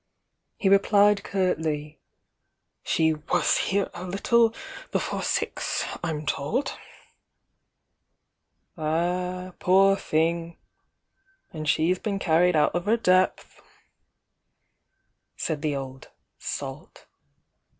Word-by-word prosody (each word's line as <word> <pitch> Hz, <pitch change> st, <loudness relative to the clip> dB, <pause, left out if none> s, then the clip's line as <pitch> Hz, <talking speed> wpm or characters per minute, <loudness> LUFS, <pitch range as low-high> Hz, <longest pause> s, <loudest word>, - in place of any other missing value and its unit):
He 195 Hz, -, 0 dB
replied 200 Hz, +1 st, +4 dB
curtly: 155 Hz, -5 st, -2 dB, 0.4 s
„ -, -, -53 dB
"She 160 Hz, -1 st, +2 dB
was 150 Hz, -1 st, +1 dB
here 200 Hz, 0 st, +1 dB
a 175 Hz, -, -7 dB
little 225 Hz, +5 st, +2 dB, 0.4 s
before -, -, -2 dB
six, -, -, -1 dB, 0.2 s
I'm 155 Hz, -3 st, -3 dB
told 225 Hz, -, -1 dB, 1.0 s
— -, -, -51 dB
"Ah 180 Hz, +3 st, -2 dB
poor 195 Hz, +2 st, +5 dB
thing, 165 Hz, -1 st, -1 dB, 1.0 s
then 155 Hz, -2 st, -5 dB
she's 165 Hz, +4 st, +2 dB
been 200 Hz, -2 st, -2 dB
carried 175 Hz, -1 st, +3 dB
out 150 Hz, -1 st, +3 dB
of 175 Hz, +1 st, -2 dB
her 225 Hz, +3 st, +3 dB
depVhi"Cki 185 Hz, -4 st, +2 dB, 2.2 s
the 150 Hz, -2 st, -1 dB
old 135 Hz, -1 st, -7 dB, 0.3 s
"salt." -, -, -7 dB
180 Hz, 95 wpm, -25 LUFS, 155-195 Hz, 2.2 s, poor